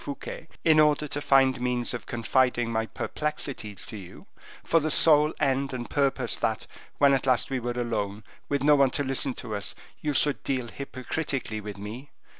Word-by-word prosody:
Fouquet, 145 +3 -7 0.2
in 160 -2 +6
order 150 0 +3
to 145 +1 -4
find 135 -3 +3
means 125 -1 +1
of 120 - -6
confiding 120 0 +1
my 110 0 -1
perplexities 135 -10 -4
to 110 - -7
you, 95 -3 -12 0.4
for 165 - +3
the 155 0 -1
sole 150 -1 +5
end 135 -1 0
and 120 -1 -6
purpose 140 -2 +1
that, - - -1 0.3
when 140 -1 +5
at 135 0 0
last 130 +1 +2
we 135 - 0
were 120 0 -4
alone, 110 -4 -3 0.3
with 140 -1 0
no 150 +1 +6
one 140 -2 +4
to 145 +3 -2
listen 135 -1 -1
to 110 -4 -5
us, 100 - -4 0.3
you 150 -2 -1
should 145 +1 +3
deal 130 -3 -2
hypocritically 130 -3 -4
with 105 -1 -7
me. 110 +8 -8
130 Hz, 185 wpm, -27 LUFS, 120-145 Hz, 0.4 s, in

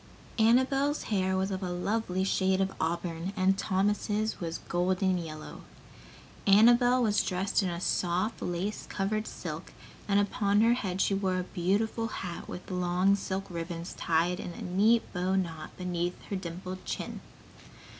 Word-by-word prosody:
Annabel's 265 +6 +3
hair 190 -3 0
was 190 +1 0
of 190 0 -3
a 185 - -2
lovely 190 +1 -1
shade 190 0 +2
of 195 0 0
auburn 170 +2 -2
and 190 +1 +4
Thomas' 205 +2 0
was 165 -1 -3
golden 185 +1 +1
yellow. 155 -2 -8 0.9
Annabel 240 +5 +6
was 210 -2 +3
dressed 190 +2 0
in 175 -3 -2
soft, 180 +4 0
lace 180 +4 -3
covered 215 +2 -1
silk - - -6 0.3
and 200 0 +4
upon 205 0 +2
her 230 +1 +5
head 190 -6 -2
she - - +2
wore 190 -2 0
a 180 - -1
beautiful 210 +6 0
hat 180 -5 -6
with 180 - -7
long 180 +2 +2
silk 195 0 -3
ribbons 170 -1 -5
tied 170 +2 +1
in 175 - -5
a - - -8
neat 210 +6 +3
bow 185 +1 0
knot 165 -5 -3
beneath 180 -1 -2
her - - 0
dimpled 185 +1 -6
chin. - - -5
190 Hz, 150 wpm, -29 LUFS, 180-205 Hz, 0.9 s, Annabel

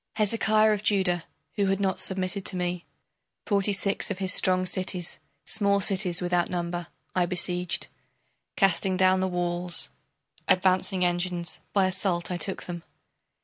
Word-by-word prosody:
Hezekiah 215 0 +3
of 205 - -2
Judah, 190 -5 +1 0.3
who 200 -1 +2
had 195 0 +1
not 190 -1 0
submitted 190 +1 0
to 190 - +2
me, 180 -1 -3 0.6
Forty 200 -1 +1
six 200 0 0
of 200 - -3
his 190 0 +1
strong 185 -1 +3
cities, 185 -1 -2 0.3
small 200 -2 +2
cities 185 -3 +1
without 175 -1 +1
number, 175 -1 -3 0.3
I 180 -1 +1
besieged. 180 0 0 0.7
Casting 190 -1 +2
down 185 0 +4
the 190 - 0
walls, 175 -1 -1 0.6
advancing 185 0 +2
engines, 175 -1 -2
by 195 -2 +3
assault 185 -2 -1
I 180 - -1
took 190 +2 0
them. 175 -1 -6
185 Hz, 145 wpm, -26 LUFS, 175-195 Hz, 0.7 s, down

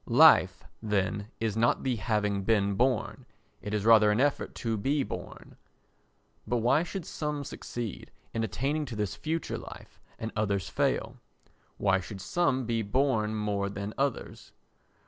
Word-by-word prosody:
Life, 120 -8 +6 0.2
then, 105 -1 -1
is 110 -2 -1
not 115 +1 +2
the 130 -3 0
having 105 -1 0
been 100 -1 +2
born—it 110 -2 -3
is 105 -1 -1
rather 110 -2 +7
an 105 +2 +2
effort 145 +2 0
to 115 -2 -2
be 135 +7 +1
born. - - -8 0.9
But 120 - +1
why 125 +6 +3
should 175 0 -5
some 150 -2 -3
succeed 120 -5 -6 0.2
in 115 - -1
attaining 135 - -1
to 125 -4 -7
this 105 -2 -2
future 160 +1 -3
life - - -12 0.2
and 110 0 -5
others 100 -3 0
fail? 130 -4 0 0.6
Why 95 -2 +2
should 95 +2 -8
some 130 - 0
be 115 -1 0
born 110 -1 +1
more 100 -2 -1
than 100 +1 -5
others? 140 0 -3
110 Hz, 145 wpm, -29 LUFS, 105-135 Hz, 0.9 s, rather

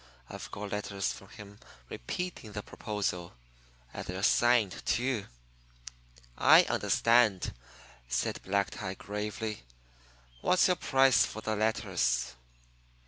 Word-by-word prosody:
I've - - -8
got 100 +1 -6
letters 100 -1 -2
from 100 - -13
him 100 0 -12 0.3
repeating 115 - -5
the 105 - -5
proposal. 95 - -4 0.6
And - - -5
they're 95 +1 -5
signed, 120 -3 +3
too." 120 -3 0 1.1
"I - - +7
understand," 115 -5 +2 0.6
said - - -1
Black 100 +1 0
Tie 95 -2 -5
gravely. 105 +2 -4 0.8
"What's 185 - +4
your 180 -1 +3
price 135 -3 +4
for 110 - -5
the 110 0 -2
letters?" 85 - 0
105 Hz, 110 wpm, -30 LUFS, 100-115 Hz, 1.1 s, I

